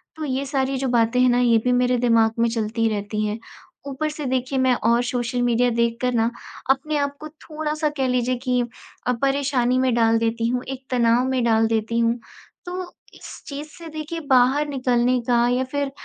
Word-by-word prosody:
तो 315 Hz, -, -5 dB
ये 270 Hz, 0 st, -2 dB
सारी 270 Hz, -1 st, -1 dB
जो 265 Hz, 0 st, -2 dB
बातें 240 Hz, +1 st, +2 dB
हैं 255 Hz, -, +5 dB
ना 245 Hz, 0 st, +3 dB
ये 235 Hz, -2 st, +4 dB
भी 250 Hz, -, +3 dB
मेरे 250 Hz, 0 st, +2 dB
दिमाग़ 230 Hz, -1 st, +2 dB
में 235 Hz, -, +3 dB
चलती 225 Hz, 0 st, -1 dB
रहती 210 Hz, 0 st, -2 dB
हैं, 210 Hz, +2 st, -3 dB, 0.5 s
ऊपर 305 Hz, +3 st, -2 dB
से 300 Hz, -1 st, -6 dB
देखिए 260 Hz, +1 st, -1 dB
मैं 260 Hz, -1 st, +3 dB
और 235 Hz, +2 st, +3 dB
सोशल 245 Hz, 0 st, -2 dB
मीडिया 245 Hz, 0 st, +2 dB
देख 235 Hz, 0 st, 0 dB
कर 250 Hz, 0 st, 0 dB
ना 230 Hz, -1 st, +2 dB, 0.4 s
अपने 295 Hz, +3 st, 0 dB
आप 285 Hz, 0 st, -1 dB
को 310 Hz, -, -6 dB
थोड़ा-सा 305 Hz, 0 st, -3 dB
कह 265 Hz, -1 st, +1 dB
लीजिए 250 Hz, 0 st, 0 dB
कि 250 Hz, -2 st, +1 dB, 0.5 s
अ, 250 Hz, -, +3 dB
परेशानी 270 Hz, -3 st, +1 dB
में 255 Hz, -2 st, +2 dB
डाल 225 Hz, -1 st, +3 dB
देती 230 Hz, 0 st, 0 dB
हूँ, 250 Hz, +1 st, -1 dB
एक 270 Hz, 0 st, -6 dB
तनाव 240 Hz, 0 st, +3 dB
में 255 Hz, -2 st, 0 dB
डाल 225 Hz, -1 st, +3 dB
देती 225 Hz, +1 st, -1 dB
हूँ। 235 Hz, +1 st, +1 dB, 0.5 s
तो 360 Hz, 0 st, -5 dB, 0.2 s
इस -, -, -11 dB
चीज़ 290 Hz, +1 st, -6 dB
से 335 Hz, -1 st, -10 dB
देखिए 310 Hz, +2 st, -5 dB
बाहर 265 Hz, +3 st, +4 dB
निकलने 250 Hz, -2 st, +1 dB
का 240 Hz, 0 st, +3 dB
या 250 Hz, +1 st, +1 dB
फिर 285 Hz, -1 st, -1 dB
250 Hz, 200 wpm, -22 LUFS, 235-275 Hz, 0.5 s, हैं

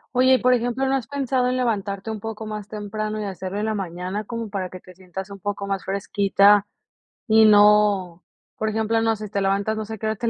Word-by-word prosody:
Oye, 260 Hz, +1 st, +5 dB
y -, -, +6 dB
por 255 Hz, 0 st, +4 dB
ejemplo, 245 Hz, +2 st, 0 dB
¿no 270 Hz, -, +2 dB
has 255 Hz, -4 st, -3 dB
pensado 265 Hz, -2 st, 0 dB
en 250 Hz, -, 0 dB
levantarte 215 Hz, -4 st, -2 dB
un 220 Hz, -, -5 dB
poco 220 Hz, +1 st, -6 dB
más 210 Hz, -1 st, -6 dB
temprano 215 Hz, +1 st, -4 dB
y -, -, -3 dB
hacerlo 190 Hz, 0 st, -5 dB
en 210 Hz, -, -1 dB
la 220 Hz, -, -1 dB
mañana 185 Hz, +2 st, -4 dB
como 230 Hz, 0 st, -5 dB
para 190 Hz, -2 st, -4 dB
que 185 Hz, 0 st, -10 dB
te 185 Hz, -, -15 dB
sientas 190 Hz, +2 st, -8 dB
un 200 Hz, 0 st, -10 dB
poco 200 Hz, +1 st, -4 dB
más 195 Hz, -1 st, -3 dB
fresquita 200 Hz, +1 st, +3 dB, 0.6 s
y 220 Hz, -1 st, +6 dB
no?, 205 Hz, -4 st, +4 dB, 0.3 s
por 220 Hz, -, -2 dB
ejemplo, 220 Hz, +1 st, 0 dB
no 225 Hz, 0 st, +2 dB
sé, 215 Hz, 0 st, -7 dB
te 200 Hz, 0 st, -2 dB
levantas, 200 Hz, +2 st, 0 dB
no 220 Hz, -, -3 dB
sé 220 Hz, -, -7 dB
a -, -, -12 dB
qué 220 Hz, -, -6 dB
hora 220 Hz, 0 st, 0 dB
te 235 Hz, -, -3 dB
210 Hz, 240 wpm, -23 LUFS, 195-225 Hz, 0.6 s, y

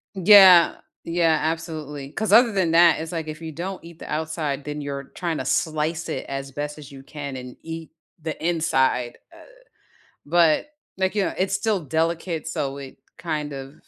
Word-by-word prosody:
Yeah, 190 Hz, -2 st, +8 dB, 0.3 s
yeah, 165 Hz, -1 st, +2 dB
absolutely. 155 Hz, -3 st, -4 dB
'Cause 220 Hz, +5 st, -2 dB
other 235 Hz, 0 st, +7 dB
than 185 Hz, -5 st, +1 dB
that, 165 Hz, -1 st, +6 dB
it's 160 Hz, +1 st, -5 dB
like 165 Hz, -2 st, -4 dB
if 155 Hz, +1 st, -7 dB
you 160 Hz, -1 st, -6 dB
don't 180 Hz, +4 st, -6 dB
eat 170 Hz, -1 st, -13 dB
the -, -, -9 dB
outside, 155 Hz, -3 st, -2 dB
then 150 Hz, 0 st, -5 dB
you're 140 Hz, -1 st, -5 dB
trying 170 Hz, -4 st, -2 dB
to 130 Hz, -, -4 dB
slice 160 Hz, +3 st, -1 dB
it -, -, -4 dB
as 135 Hz, 0 st, -5 dB
best 150 Hz, +2 st, -5 dB
as 145 Hz, -1 st, -11 dB
you 135 Hz, -1 st, -12 dB
can 140 Hz, -2 st, -7 dB
and 125 Hz, -1 st, -9 dB
eat 165 Hz, 0 st, -8 dB, 0.3 s
the 160 Hz, -1 st, -4 dB
inside, 130 Hz, -7 st, +1 dB, 0.2 s
uh, -, -, -15 dB, 0.9 s
but 165 Hz, -, +3 dB, 0.3 s
like, 190 Hz, +2 st, 0 dB
you 205 Hz, -, +1 dB
know, -, -, -2 dB
it's 190 Hz, +1 st, -1 dB
still 210 Hz, 0 st, 0 dB
delicate, 165 Hz, +2 st, -1 dB
so 140 Hz, -3 st, -3 dB
it 135 Hz, -1 st, -10 dB, 0.2 s
kind 150 Hz, -3 st, -3 dB
of 135 Hz, +1 st, -8 dB
160 Hz, 180 wpm, -23 LUFS, 145-170 Hz, 0.9 s, Yeah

